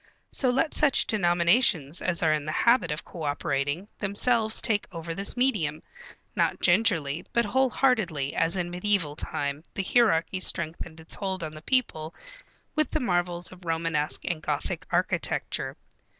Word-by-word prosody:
So 260 - +1
let 270 +5 +1
such 290 -3 +3
denominations 175 - +3
as 175 -2 0
are 155 -1 +4
in 150 -1 -2
the 155 - -2
habit 235 -2 +3
of 150 - -4
cooperating, 145 +1 -2
themselves 220 +2 +1
take 210 -3 0
over 165 -1 -5
this 200 +7 -2
medium, 175 - 0 0.5
not - - +1
gingerly, 175 -5 +2
but 235 0 +3
whole 260 +5 +2
heartedly, 185 - +1
as 165 +3 +2
in 175 -1 -2
mediæval 180 -4 0
time 145 -1 -3
the 195 - -1
hierarchy 190 -5 +2
strengthened 165 -2 -3
its 160 - -4
hold 190 -3 -3
on 155 -1 -5
the 155 - -10
people 165 - -1 0.6
with 310 -1 +2
the - - -1
marvels 175 -4 -1
of 185 0 -14
Romanesque 165 -2 -1
and 165 -3 -2
Gothic - - -3
architecture. - - -1
175 Hz, 150 wpm, -27 LUFS, 155-215 Hz, 0.6 s, are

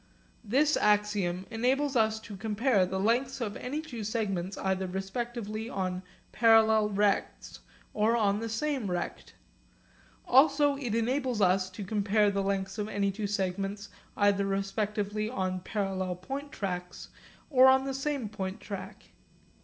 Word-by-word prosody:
This 280 +7 +2
axiom 205 -3 +1
enables 260 +5 +1
us 220 -1 +2
to 215 -2 -9
compare 210 0 +1
the 190 +1 -3
lengths 245 +7 +1
of 215 -4 -3
any 285 +5 -4
two 250 -9 -7
segments 200 -4 -2
either 190 0 -1
respectively 215 +3 -4
on 185 -3 -2 0.3
parallel 220 -2 +5
rects 205 0 -1 0.3
or 220 +3 +2
on 205 -2 +2
the 225 0 -4
same 255 -1 -1
rect. 175 -1 -4 0.9
Also 285 +2 +5
it 250 -6 -3
enables 250 +1 0
us 185 -1 +3
to 185 +2 -7
compare 205 +1 +2
the 200 0 -1
lengths 195 +1 -2
of 210 0 -2
any 200 -2 0
two 205 +1 -3
segments 195 +1 -2 0.3
either 200 -1 +3
respectively 205 +2 -2
on 185 -5 -2
parallel 190 -2 -2
point 275 +11 -6
tracks 180 -2 -5 0.4
or 260 -1 +7
on 265 0 +5
the 270 0 -3
same 270 -3 -2
point 190 -2 -5
track. 200 -3 -8
210 Hz, 140 wpm, -29 LUFS, 195-235 Hz, 0.9 s, or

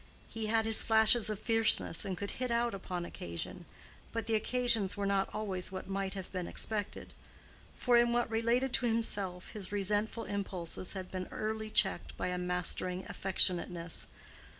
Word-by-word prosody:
He 225 -1 -3
had 225 0 +2
his 225 0 +1
flashes 220 0 +5
of 215 - -1
fierceness 225 -6 +2
and 190 -2 -3
could 200 - -3
hit 255 0 -3
out 235 0 +1
upon 180 -2 -4
occasion, 85 - -6 0.5
but 230 -2 -2
the 225 - -1
occasions 225 -3 +1
were 200 - -1
not 195 -1 +2
always 190 -4 -2
what 190 0 -6
might 195 0 -2
have 190 -2 -6
been 180 -2 -3
expected. 210 -2 -2 0.6
For 245 -1 +4
in 235 0 +5
what 240 0 +2
related 235 +3 +1
to 245 - +3
himself 200 -5 -1
his 200 -3 -7
resentful 205 +3 0
impulses 185 -3 -3
had 185 -2 -6
been 185 -1 -4
early 220 0 -3
checked 195 -2 +1
by - - -1
a 180 0 -2
mastering 180 +1 -1
affectionateness. 175 -3 +1
205 Hz, 165 wpm, -33 LUFS, 185-225 Hz, 0.6 s, flashes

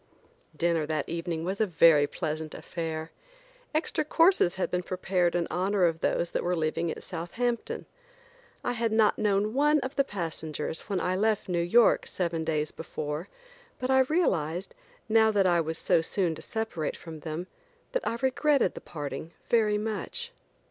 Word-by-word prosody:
Dinner 170 -3 +1
that 155 -2 -1
evening 165 -1 -3
was 190 +4 -2
a 215 - +3
very 160 -4 +5
pleasant 155 -1 -4
affair. 160 -1 -5 0.6
Extra 310 0 0
courses 330 - +4
had 190 - -2
been 180 - +1
prepared 180 -1 0
in 175 -1 +1
honor 185 +2 +2
of 165 -1 +1
those 170 0 0
that - - -1
were 180 +1 +1
leaving 160 +1 -1
at - - -5
Southampton. 235 +8 -3 0.8
I - - 0
had 230 -1 0
not 220 -1 +3
known 210 0 +1
one 295 +3 +4
of 260 +2 -5
the 275 - +4
passengers 160 - -4
when 195 -2 0
I 180 +1 0
left 215 +2 +1
New 175 -2 0
York 220 +7 +4
seven 170 -3 -2
days 155 -1 -1
before, 155 +1 -5 0.5
but 255 +1 -1
I 265 - +5
realized, 185 - 0 0.3
now 220 0 +5
that 205 -3 +3
I 175 -2 +4
was 160 0 -3
so 165 - +3
soon 170 0 0
to 160 - -8
separate 220 -9 -3
from 160 -2 -9
them, 160 +3 -4 0.5
that - - -1
I 230 - -1
regretted 270 -3 +3
the - - -8
parting 155 +2 -6 0.2
very 215 -3 +4
much. 225 - -4
180 Hz, 170 wpm, -28 LUFS, 160-220 Hz, 0.8 s, very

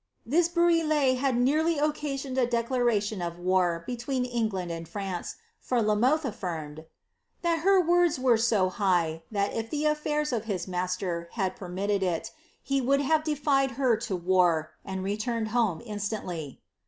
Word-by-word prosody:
' - - -45
This 340 0 +4
brouillee 325 -6 +3
had 260 -1 +1
nearly 310 +6 +2
occasioned 285 -3 -2
a 245 - +3
leclaration 235 -4 0
of 170 0 -4
war 175 -2 +1
between 250 +1 -2
England 215 -8 -2
and 165 -1 -6
France, 195 -4 -4 0.2
for 250 - 0
La 215 -1 +2
Mothc 255 +9 +3
aflirnied, 160 - -5 0.6
'that 335 -1 +2
her 385 +3 +4
words 350 -2 +3
were 255 -2 +4
so 220 -5 +2
high, 175 -5 0
that 200 -2 -1
if 225 0 -3
the 300 0 -2
affairs 300 -1 0
of 225 -2 -2
his 190 -5 -3
master 180 -1 -2
had 190 -4 -1
per 195 -7 -9
aitted 200 +2 -1
it, 175 -3 -1 0.3
he 275 0 0
would 275 +3 +2
have 310 +2 +2
defied 280 -3 +1
her 255 -4 +3
to 220 -3 -3
wan 175 -3 +2 0.2
and 190 -1 -4
returned 220 +3 -2
home 220 -6 0
instantly." 200 - -5
225 Hz, 165 wpm, -28 LUFS, 185-275 Hz, 0.6 s, This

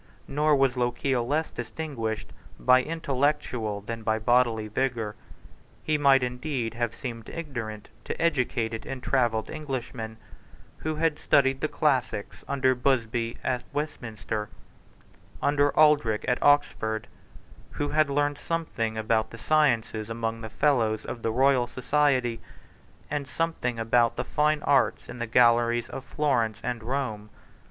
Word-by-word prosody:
Nor 150 +1 +2
was 135 -2 +2
Lochiel 120 0 0
less 155 +4 0
distinguished 120 -4 -4 0.3
by 130 0 +5
intellectual 135 -8 -1
than 115 +2 -6
by 110 0 +1
bodily 115 -1 +2
vigour. 115 -2 -2 0.7
He 155 - +1
might 135 -2 +5
indeed 125 -2 -2
have 120 -1 -2
seemed 115 -3 -6
ignorant 120 -10 -6 0.2
to - - -4
educated 125 -8 0
and 135 -1 -6
travelled 120 -5 +1
Englishmen, 125 -7 -5 0.6
who 155 0 -3
had 155 -1 0
studied 135 -1 +3
the 155 - +1
classics 130 -9 -1
under 130 -2 +2
Busby 120 -3 0
at 125 -1 -1
Westminster 115 -8 -4
and - - -27 0.3
under 145 0 +3
Aldrich 150 -8 +4
at 125 - 0
Oxford, 110 -7 +2 0.7
who 145 - -2
had 155 -1 +2
learned 145 +1 0
something 120 -10 -2
about 110 0 +1
the 115 - -10
sciences 115 -6 +1
among 115 0 -3
Fellows 110 -5 +1
of 120 - -6
the 115 - 0
Royal 130 0 +3
Society, 130 -3 +1 0.7
and 145 -2 -2
something 140 -5 -2
about 115 +1 +2
the - - -3
fine 150 0 +1
arts 140 -3 +2
in 125 - -8
the 120 - -2
galleries 120 0 +3
of 130 - -6
Florence 125 -7 0
and 120 -2 -2
Rome. 110 -4 -3
125 Hz, 135 wpm, -27 LUFS, 115-145 Hz, 0.7 s, by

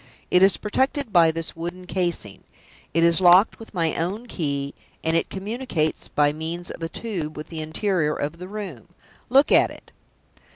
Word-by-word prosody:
It 180 - +5
is 195 +1 +5
protected 265 +3 -1
by 170 -2 +6
this 165 0 -3
wooden 175 +2 -6
casing; 175 - -3 0.5
it 165 +2 +2
is 170 +2 +5
locked 180 +4 +6
with 225 -2 -12
my 165 -2 +1
own 195 +8 -2
key; 140 - -3 0.3
and 160 0 +1
it 165 - +1
communicates 195 -5 -2
by 145 0 +2
means 165 +3 -4
of - - -9
a 165 - -3
tube 170 -8 -4
with 150 - -7
the 160 -2 -5
interior 155 0 0
of 150 +4 -4
the 180 - -7
room. 190 - -7 0.4
Look 270 +4 +5
at - - +5
it!" - - -14
170 Hz, 175 wpm, -24 LUFS, 160-195 Hz, 0.5 s, by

